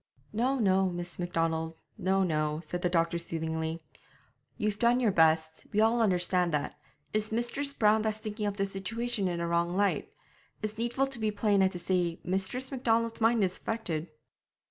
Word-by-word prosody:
'No, 250 Hz, +5 st, +1 dB
no, 190 Hz, -4 st, +3 dB
Miss 175 Hz, 0 st, -5 dB
Macdonald 165 Hz, -2 st, -1 dB, 0.2 s
no, 190 Hz, +1 st, +1 dB
no,' 155 Hz, -3 st, 0 dB
said 175 Hz, +2 st, -5 dB
the 180 Hz, -, +1 dB
doctor 170 Hz, -1 st, +1 dB
soothingly. 160 Hz, -1 st, -3 dB, 0.8 s
'You've 210 Hz, 0 st, -1 dB
done 240 Hz, +1 st, +4 dB
your 235 Hz, -5 st, +3 dB
best, 160 Hz, -2 st, +2 dB
we 210 Hz, -, +1 dB
all 225 Hz, +2 st, +4 dB
understand 180 Hz, -3 st, +2 dB
that; 145 Hz, -, -2 dB, 0.4 s
it's 215 Hz, 0 st, -1 dB
Mistress 240 Hz, +5 st, 0 dB
Brown 215 Hz, -4 st, +3 dB
that's 215 Hz, -1 st, -1 dB
thinking 215 Hz, -1 st, -4 dB
of 200 Hz, 0 st, -3 dB
the 195 Hz, -, +1 dB
situation 200 Hz, +2 st, -2 dB
in 175 Hz, -1 st, -2 dB
a 170 Hz, -, -1 dB
wrong 170 Hz, +1 st, +1 dB
light; 200 Hz, +1 st, +1 dB, 0.5 s
it's 215 Hz, +1 st, -4 dB
needful 240 Hz, +3 st, +1 dB
to 270 Hz, -3 st, -7 dB
be 215 Hz, -1 st, +1 dB
plain 205 Hz, -1 st, +2 dB
and 190 Hz, 0 st, +4 dB
to -, -, -4 dB
say 175 Hz, -1 st, 0 dB
that -, -, -27 dB
Mistress 195 Hz, +9 st, -1 dB
Macdonald's 230 Hz, -3 st, 0 dB
mind 225 Hz, -1 st, +4 dB
is 185 Hz, -1 st, -1 dB
affected.' 175 Hz, -8 st, -3 dB
195 Hz, 180 wpm, -30 LUFS, 170-225 Hz, 0.8 s, done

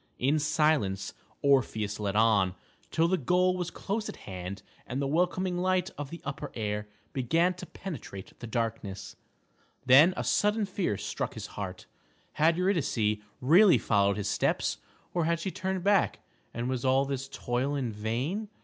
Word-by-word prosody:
In 140 Hz, +5 st, +2 dB
silence 150 Hz, -11 st, +1 dB, 0.3 s
Orpheus 110 Hz, -7 st, +2 dB
led 100 Hz, -1 st, -2 dB
on, 105 Hz, -4 st, +3 dB, 0.3 s
till 165 Hz, +1 st, +2 dB
the 185 Hz, +1 st, +1 dB
goal 180 Hz, +5 st, +2 dB
was 180 Hz, -2 st, -2 dB
close 215 Hz, +2 st, -3 dB
at -, -, -6 dB
hand 95 Hz, +1 st, -7 dB, 0.2 s
and 130 Hz, -, -3 dB
the 140 Hz, -, 0 dB
welcoming 180 Hz, +4 st, 0 dB
light 185 Hz, 0 st, +1 dB
of 145 Hz, -1 st, -6 dB
the 170 Hz, -, -8 dB
upper 140 Hz, -, -5 dB
air 105 Hz, -1 st, -2 dB, 0.3 s
began 165 Hz, +8 st, +2 dB
to 180 Hz, -, -9 dB
penetrate 135 Hz, -, -8 dB
the 120 Hz, -, -7 dB
darkness. 110 Hz, -4 st, -3 dB, 0.7 s
Then 150 Hz, +8 st, +7 dB
a -, -, -1 dB
sudden 210 Hz, +1 st, +2 dB
fear 185 Hz, -, -1 dB
struck -, -, -4 dB
his -, -, -6 dB
heart. 95 Hz, -2 st, -6 dB, 0.5 s
Had 165 Hz, +2 st, +3 dB
Eurydice 150 Hz, -, +1 dB, 0.2 s
really 175 Hz, +9 st, +6 dB
followed 100 Hz, -1 st, +2 dB
his 105 Hz, -1 st, -2 dB
steps, -, -, 0 dB, 0.3 s
or 170 Hz, -2 st, +1 dB
had 170 Hz, 0 st, +1 dB
she 190 Hz, +3 st, -3 dB
turned 190 Hz, -1 st, -3 dB
back, 200 Hz, -1 st, +2 dB, 0.3 s
and 120 Hz, +1 st, -3 dB
was 130 Hz, -1 st, -2 dB
all 135 Hz, +1 st, +3 dB
his 135 Hz, 0 st, -4 dB
toil 130 Hz, +2 st, -1 dB
in 130 Hz, -5 st, -1 dB
vain? 125 Hz, -, -2 dB
140 Hz, 160 wpm, -29 LUFS, 110-180 Hz, 0.7 s, Then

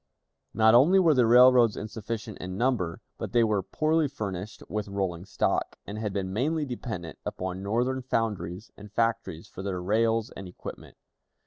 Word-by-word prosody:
Not 110 Hz, 0 st, +5 dB
only 145 Hz, +11 st, +6 dB
were 170 Hz, -5 st, +5 dB
the 125 Hz, -4 st, +4 dB
railroads 125 Hz, -1 st, +6 dB
insufficient 110 Hz, 0 st, -6 dB
in 95 Hz, +1 st, -5 dB
number, 110 Hz, -9 st, 0 dB, 0.2 s
but -, -, -5 dB
they 120 Hz, -1 st, +5 dB
were 105 Hz, -3 st, +1 dB
poorly 155 Hz, -, +1 dB
furnished 105 Hz, -7 st, -6 dB
with 105 Hz, -1 st, -3 dB
rolling 95 Hz, -3 st, -3 dB
stock, -, -, -1 dB
and 105 Hz, +1 st, -6 dB
had 105 Hz, -2 st, -2 dB
been 95 Hz, -1 st, -3 dB
mainly 150 Hz, +8 st, 0 dB
dependent 110 Hz, -, -6 dB
upon 95 Hz, 0 st, -4 dB
Northern 120 Hz, +6 st, 0 dB
foundries 105 Hz, -6 st, -2 dB
and 105 Hz, 0 st, -12 dB
factories 115 Hz, -7 st, -1 dB
for -, -, -9 dB
their 95 Hz, -2 st, -3 dB
rails 110 Hz, +4 st, +1 dB
and 95 Hz, -, -8 dB
equipment. 90 Hz, -, -10 dB
110 Hz, 160 wpm, -27 LUFS, 95-125 Hz, 0.2 s, only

